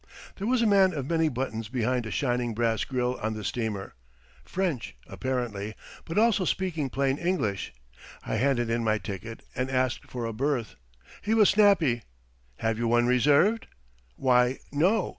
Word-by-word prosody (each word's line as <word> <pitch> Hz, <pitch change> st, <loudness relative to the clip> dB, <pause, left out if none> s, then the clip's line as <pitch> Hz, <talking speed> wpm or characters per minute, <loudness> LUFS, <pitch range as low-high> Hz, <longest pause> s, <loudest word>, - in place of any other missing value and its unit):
There 200 Hz, -, -3 dB
was 250 Hz, -1 st, +2 dB
a -, -, +3 dB
man 195 Hz, -4 st, +4 dB
of 135 Hz, -3 st, -3 dB
many 165 Hz, -1 st, +2 dB
buttons 115 Hz, -5 st, -4 dB
behind 125 Hz, -1 st, 0 dB
a -, -, -5 dB
shining 120 Hz, -1 st, -1 dB
brass 115 Hz, -2 st, +1 dB
grill 125 Hz, -1 st, -1 dB
on 110 Hz, 0 st, -1 dB
the 110 Hz, -, -6 dB
steamer 105 Hz, -2 st, -3 dB, 0.5 s
French, 175 Hz, -10 st, -2 dB
apparently, 115 Hz, -5 st, -3 dB, 0.3 s
but 165 Hz, -, -5 dB
also 220 Hz, -3 st, +4 dB
speaking 165 Hz, -6 st, -1 dB
plain 135 Hz, +1 st, 0 dB
English. 160 Hz, -, -1 dB, 0.5 s
I -, -, -1 dB
handed 120 Hz, -3 st, +1 dB
in 115 Hz, 0 st, 0 dB
my 110 Hz, -1 st, +2 dB
ticket 105 Hz, +2 st, -7 dB
and 130 Hz, +1 st, -1 dB
asked 130 Hz, -1 st, 0 dB
for 120 Hz, -2 st, -4 dB
a 115 Hz, -, -3 dB
berth. 130 Hz, -1 st, -1 dB, 0.5 s
He 220 Hz, +2 st, +1 dB
was 215 Hz, -3 st, +6 dB
snappy. 195 Hz, -, +4 dB, 0.6 s
"Have 115 Hz, 0 st, -1 dB
you 120 Hz, -, 0 dB
one 120 Hz, +1 st, +3 dB
reserved?" 145 Hz, -, +3 dB, 0.5 s
"Why, 125 Hz, -, +3 dB
no. 180 Hz, +8 st, +2 dB
130 Hz, 160 wpm, -27 LUFS, 115-165 Hz, 0.6 s, was